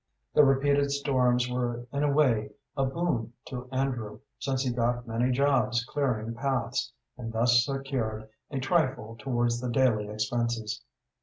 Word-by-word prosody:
The 150 Hz, -, +7 dB
repeated 140 Hz, +1 st, +3 dB
storms 130 Hz, -3 st, +2 dB
were 120 Hz, -1 st, -2 dB
in 140 Hz, -, 0 dB
a 145 Hz, -1 st, +3 dB
way 130 Hz, -8 st, +3 dB, 0.3 s
a 135 Hz, -, +1 dB
boon 130 Hz, -6 st, -1 dB, 0.2 s
to 125 Hz, -1 st, -6 dB
Andrew, 125 Hz, -5 st, -2 dB, 0.2 s
since 135 Hz, -1 st, -1 dB
he 130 Hz, -, 0 dB
got 120 Hz, 0 st, 0 dB
many 115 Hz, +3 st, +1 dB
jobs 125 Hz, -4 st, +2 dB
clearing 120 Hz, -6 st, -1 dB
paths, 125 Hz, -1 st, -1 dB, 0.3 s
and 115 Hz, -2 st, -4 dB
thus 120 Hz, +2 st, +4 dB
secured 130 Hz, -6 st, -3 dB, 0.2 s
a 140 Hz, -, -3 dB
trifle 130 Hz, -6 st, 0 dB
towards 120 Hz, -2 st, 0 dB
the 125 Hz, -, -2 dB
daily 120 Hz, -4 st, +2 dB
expenses. 115 Hz, 0 st, -2 dB
125 Hz, 145 wpm, -28 LUFS, 115-135 Hz, 0.3 s, The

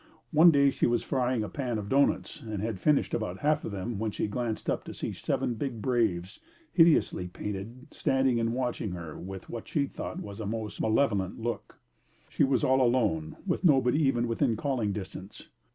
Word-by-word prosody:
One 165 Hz, +2 st, +8 dB
day 140 Hz, -3 st, +5 dB
she -, -, +1 dB
was 120 Hz, -1 st, +1 dB
frying 125 Hz, -3 st, 0 dB
a -, -, -3 dB
pan 125 Hz, -3 st, -3 dB
of 105 Hz, -1 st, -5 dB
doughnuts 140 Hz, +5 st, +1 dB
and 110 Hz, -3 st, -5 dB
had 105 Hz, -1 st, -3 dB
finished 150 Hz, +7 st, +2 dB
about 105 Hz, -5 st, -2 dB
half 150 Hz, +1 st, +2 dB
of -, -, -4 dB
them 100 Hz, +2 st, -4 dB
when 110 Hz, 0 st, 0 dB
she -, -, -2 dB
glanced 110 Hz, +1 st, -3 dB
up -, -, 0 dB
to -, -, -8 dB
see -, -, -4 dB
seven 120 Hz, -, -1 dB
big 120 Hz, 0 st, -4 dB
braves, 105 Hz, -6 st, 0 dB, 0.3 s
hideously 165 Hz, -, +4 dB
painted, 105 Hz, +7 st, -6 dB
standing 130 Hz, -2 st, +1 dB
and 115 Hz, 0 st, +1 dB
watching 120 Hz, -5 st, -2 dB
her 85 Hz, -3 st, -7 dB
with 95 Hz, 0 st, -8 dB
what 115 Hz, -, -7 dB
she 145 Hz, -2 st, +1 dB
thought -, -, -6 dB
was 100 Hz, 0 st, -8 dB
a 110 Hz, -, -4 dB
most 110 Hz, -1 st, -4 dB
malevolent 110 Hz, -5 st, +1 dB
look. 120 Hz, +1 st, -4 dB, 0.5 s
She -, -, +1 dB
was 135 Hz, -4 st, +2 dB
all 130 Hz, 0 st, +4 dB
alone, 110 Hz, -11 st, +1 dB
with 180 Hz, -1 st, -1 dB
nobody 140 Hz, -3 st, +4 dB
even 120 Hz, -4 st, +2 dB
within 115 Hz, -1 st, +1 dB
calling 125 Hz, -6 st, -1 dB
distance. 95 Hz, -1 st, -8 dB
115 Hz, 190 wpm, -29 LUFS, 105-130 Hz, 0.5 s, One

